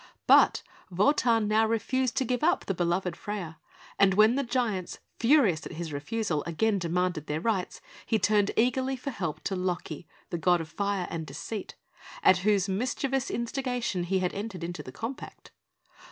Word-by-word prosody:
But - - +5 0.3
Wotan 225 +3 +2
now 220 +1 +3
refused 245 +3 0
to 265 - +2
give 245 +2 -1
up 350 +4 +2
the 195 - -1
beloved 175 0 -1
Freia, 180 -5 -6 0.4
and 190 -1 +5
when 215 +3 +6
the 275 - +1
giants, 230 -7 -2 0.2
furious 230 - +4
at - - -9
his 160 -1 -5
refusal, 165 +1 -2
again 200 +5 +1
demanded 175 -2 -1
their 150 +1 -1
rights, 190 -1 -2 0.3
he 225 - +2
turned 205 0 +2
eagerly 260 +3 +2
for 265 +2 -5
help 170 - -4
to 195 - -2
Loki, 180 -4 -3 0.2
the 170 - -2
god 175 +2 +3
of 160 -1 -6
Fire 200 +2 -1
and 160 -2 -4
Deceit, 185 +9 -6 0.5
at 185 - +6
whose 200 0 +2
mischievous 255 +6 -1
instigation 240 -6 -2
he 190 +2 +1
had 185 -1 -1
entered 200 -4 -5
into 175 -2 -5
the 130 - -10
compact. 230 - -7
200 Hz, 170 wpm, -28 LUFS, 175-230 Hz, 0.5 s, when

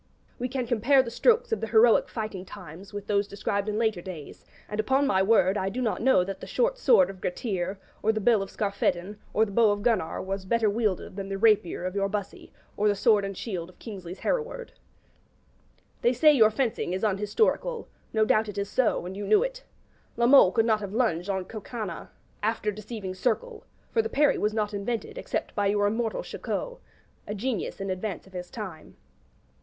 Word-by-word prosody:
We 250 +1 -2
can 255 -1 -2
compare 240 +4 +4
the 235 - -6
strokes 475 - +3
of 450 - 0
the - - -2
heroic 225 +1 +5
fighting 215 -4 -5
times 185 -1 -11
with 205 -1 -6
those 205 -1 +1
described 200 +1 -2
in 210 - -2
later 220 -5 +1
days; 170 -5 -9 0.2
and, 210 - -5
upon 265 +6 +2
my 190 -9 +2
word, 195 -1 +3
I 190 - -1
do 230 +6 -5
not 235 -4 -1
know 245 -7 +4
that 195 +1 -6
the - - -9
short - - 0
sword 370 - +5
of 190 -1 -15
Gretir, 185 0 -2 0.2
or 220 - +3
the 220 - -2
bill 220 0 +3
of 195 - -5
Skarphedin, 200 -1 -1
or 220 - +3
the 205 - -8
bow 225 +1 +4
of 205 0 -1
Gunnar 220 -9 +1
was 195 0 -4
better 220 +2 +2
wielded 205 -4 -1
than 195 -1 -5
the 195 - -3
rapier 200 -5 +2
of 185 - -2
your 195 0 0
Bussy 205 -1 -5 0.2
or 210 - +1
the 205 - +3
sword 210 0 +3
and 195 -1 -4
shield 180 -6 -4
of 185 - -18
Kingsley's 190 -5 -8
Hereward. - - -2 1.3
They 240 - +3
say 300 +5 +6
your 225 -6 +6
fencing 220 -5 -1
is 190 - -3
unhistorical; 215 - 0 0.2
no 220 -1 +2
doubt 215 0 +2
it 205 - -7
is 200 0 -3
so, 245 -8 +1
and 185 +1 -6
you 200 0 -5
knew 215 - +5
it. - - -5 0.5
La 235 - +3
Mole 250 -7 +7
could 225 +3 +2
not 220 -2 +3
have 200 -1 -6
lunged 200 -7 0
on 190 -2 -1
Coconnas 215 -4 -6 0.3
'after 215 0 0
deceiving 210 -2 -6
circle;' 465 - -2 0.3
for 455 - +3
the 450 - -4
parry 295 -5 +3
was 210 - +1
not 215 -1 -1
invented 235 - -3
except - - -3
by 205 -2 +1
your 205 0 +2
immortal 225 +2 -1
Chicot, - - -4 0.5
a 210 - -3
genius 220 -1 -3
in 195 -1 -3
advance 185 +1 -4
of 190 - -19
his 180 -1 -6
time. 190 -8 -8
210 Hz, 205 wpm, -27 LUFS, 195-235 Hz, 1.3 s, Mole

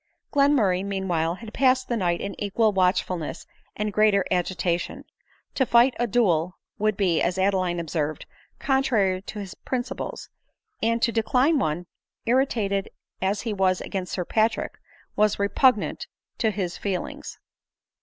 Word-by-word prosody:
Glenmurray 255 -11 +3
meanwhile, 180 -4 -1
had 220 +2 -10
passed 260 -1 +3
the 240 - -1
night 175 -5 0
in 200 - -4
equal 210 +1 +2
watchfulness 180 -3 0 0.3
and 210 0 -2
greater 210 -2 +3
agitation. 175 -1 -1 0.5
To 265 - +2
fight 240 +1 +5
a 240 - +1
duel, 185 -6 +1 0.2
would 215 -1 +1
be, 180 -5 +2
as 175 +1 0
Adeline 185 -2 +1
observed, 155 -2 -3 0.3
contrary 225 -9 +1
to 210 - -8
his 200 -2 -6
princi 255 +1 -4
ples; - - -6 0.5
and 230 +1 +1
to 235 - +3
decline 255 +7 +2
one, 165 -3 -1 0.4
irritated 225 -6 +1 0.3
as 195 +2 0
he 225 -3 -3
was 190 -2 +2
against 185 -2 -4
Sir 180 - -2
Patrick, 220 +4 0 0.4
was 210 -1 +3
repugnant 210 +3 +2 0.3
to 225 - +2
his 185 -4 -3
feelings. 195 -3 -4
200 Hz, 140 wpm, -25 LUFS, 180-230 Hz, 0.5 s, fight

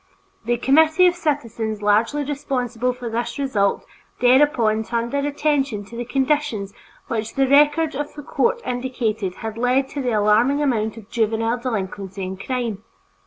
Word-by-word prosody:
The 240 +1 +1
committee 315 +7 +4
of 355 - +5
citizens 230 -10 -2
largely 225 +8 +2
responsible 250 -4 -2
for 245 -1 -7
this 235 +1 -3
result 220 -8 0 0.3
thereupon 250 -4 +4
turned 235 +1 -2
their 280 0 0
attention 280 -7 0
to 230 - -12
the 240 +1 -4
conditions 265 -6 -1 0.3
which 225 -1 -3
the 270 -1 +2
records 295 +3 +4
of 290 +2 -4
the 295 - -8
court 470 - 0
indicated 230 -6 -2
had 220 0 -5
led 255 +2 +2
to 285 - -4
the 250 -3 -1
alarming 215 +7 +3
amount 225 -6 0
of 220 -1 -13
juvenile 225 +1 0
delinquency 195 -5 -4
and 190 +1 -6
crime. 235 -6 -3
245 Hz, 155 wpm, -22 LUFS, 220-280 Hz, 0.3 s, of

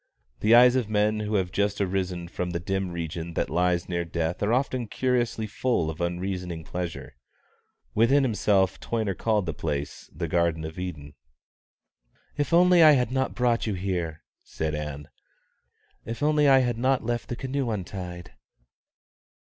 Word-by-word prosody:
The 110 +2 +5
eyes 125 +1 +7
of 125 -5 0
men 105 0 +1
who 105 0 -2
have 95 -3 0
just 100 +1 0
arisen 90 -3 -2
from 90 +1 -4
the 85 -1 -2
dim 95 +2 -2
region 85 -1 -5
that - - -1
lies 90 +1 +1
near 85 -1 -1
death 85 0 -3
are 105 - +1
often 125 -1 0
curiously 120 -1 0
full 110 -6 -1
of 80 - -9
unreasoning 90 -1 -3
pleasure. 85 -6 -6 0.8
Within 130 +6 +4
himself 100 -5 +2
Toyner 110 -4 -2
called 105 -2 0
the 80 - -3
place 75 -2 -4
the 85 +3 -4
Garden 85 -1 0
of 80 +3 -7
Eden. 75 -6 -6 1.2
"If 145 - -1
only 180 +1 +6
I 155 -2 +9
had 125 -3 +1
not 130 0 -1
brought 120 -2 +1
you 105 - -1
here!" 90 -4 -3 0.2
said 80 -1 -4
Ann. 75 -1 -5 1.0
"If 115 +3 -5
only 150 -1 +3
I 135 -1 +6
had 120 -2 -1
not 130 0 +1
left 120 0 -2
the 120 - -2
canoe 130 0 -2
untied!" 90 - -6
95 Hz, 160 wpm, -26 LUFS, 85-120 Hz, 1.2 s, I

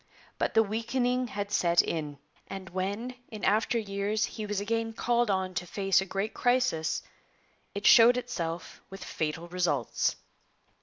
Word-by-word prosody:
But - - -1
the 225 - +6
weakening 245 +4 0
had 205 -2 -4
set 170 -3 +4
in, 150 -3 -3 0.3
and 190 -1 -7
when 200 +7 -3 0.2
in 215 -3 -8
after 215 +4 +2
years 205 0 -1
he 215 -2 -6
was 205 -1 -1
again 225 +2 -1
called 240 0 +1
on 190 -1 0
to 180 0 -3
face 195 0 +2
a 190 - -5
great 195 +3 -2
crisis, 245 -11 +1 0.7
it 200 - -4
showed 240 +2 +8
itself 175 -9 -4
with 195 0 -9
fatal 160 +2 -3
results. 175 -8 0
200 Hz, 150 wpm, -29 LUFS, 180-230 Hz, 0.7 s, showed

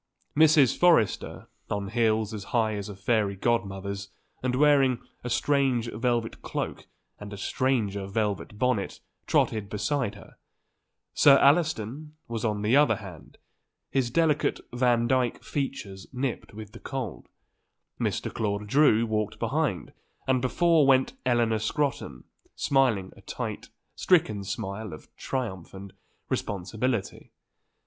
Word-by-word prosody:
Mrs. 150 -4 +5
Forrester, 165 - +2 0.2
on 100 -1 -2
heels 110 -1 +1
as 100 -2 -6
high 110 -3 +1
as 100 0 -5
a 100 - -7
fairy 100 0 0
godmother's 100 -2 -2 0.3
and 125 -1 0
wearing 135 -3 +4 0.3
a 125 - -4
strange 130 -3 +1
velvet 115 0 -1
cloak - - -4 0.3
and 105 0 -8
a 100 - -7
stranger 100 -4 -1
velvet 105 0 -2
bonnet, 125 -4 0 0.3
trotted 105 -2 +1
beside 110 +2 -1
her; - - -15 0.8
Sir 140 -1 +7
Alliston 150 -1 +1
was 115 -2 -4
on 105 -2 -1
the 110 +5 +3
other 145 +1 +5
hand, 90 -8 -11 0.5
his 130 -3 +1
delicate 150 +2 +1
Vandyke 120 0 +1
features 105 -9 -4
nipped 130 -1 -3
with 105 -1 -9
the 115 - -12
cold; 130 -7 -6 0.7
Mr. - - -2
Claude 105 -1 -2
Drew 115 -1 +4
walked 110 -2 -2
behind - - -1 0.3
and 130 -1 +2
before 160 +3 +3
went 130 -1 +4
Eleanor 120 -3 +2
Scrotton, 110 - -2 0.3
smiling 125 -9 +1
a - - -16
tight, - - -5 0.3
stricken 110 - +2
smile 100 0 -5
of 75 - -13
triumph 105 -10 -4
and 95 0 -10 0.3
responsibility. 105 +3 -3
115 Hz, 125 wpm, -27 LUFS, 100-130 Hz, 0.8 s, Sir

